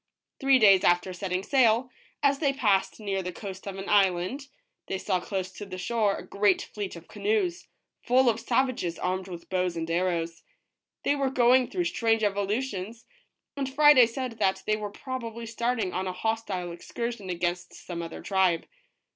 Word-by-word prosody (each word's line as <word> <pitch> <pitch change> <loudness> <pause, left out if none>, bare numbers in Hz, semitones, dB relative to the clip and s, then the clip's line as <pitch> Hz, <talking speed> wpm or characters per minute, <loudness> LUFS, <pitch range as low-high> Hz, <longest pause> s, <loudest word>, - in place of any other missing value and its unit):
Three 270 -1 +5
days 195 -5 +6
after 175 +1 +2
setting 185 0 -3
sail, 250 -1 +3 0.3
as 280 -1 +3
they 280 -3 +2
passed 210 -8 +1
near 200 -2 -2
the 180 0 -4
coast 195 0 -8
of 195 -1 -5
an 195 - -6
island, 195 +7 +2 0.4
they 190 - -2
saw 185 -1 0
close 185 0 -4
to 195 - -9
the 185 -1 -7
shore 210 +1 +1
a - - -8
great 200 -1 +2
fleet 205 -3 -4
of 170 0 -12
ca - - -12
noes, 400 -5 0 0.3
full 255 +1 +3
of 230 -1 +3
savages 240 -7 0
armed 185 +1 -2
with 175 -2 -9
bows 180 -2 0
and 165 0 -3
arrows. 170 -1 -1 0.6
They 285 - +2
were 275 -2 0
going 250 0 +4
through 360 - -1
strange 225 -7 +1
evolutions, 210 +2 -2 0.5
and 275 -2 -3
Friday 285 -3 +7
said 235 -1 -5
that 190 -2 +1
they 215 - +2
were 210 -1 -4
probably 235 -1 -6
starting 230 -4 -1
on 185 +1 -2
a 185 - -3
hostile 195 -3 -2
excursion 220 +4 -5
against 175 0 -2
some 170 -2 -6
other 165 -1 -7
tribe. 190 -4 +2
205 Hz, 175 wpm, -27 LUFS, 185-245 Hz, 0.6 s, Friday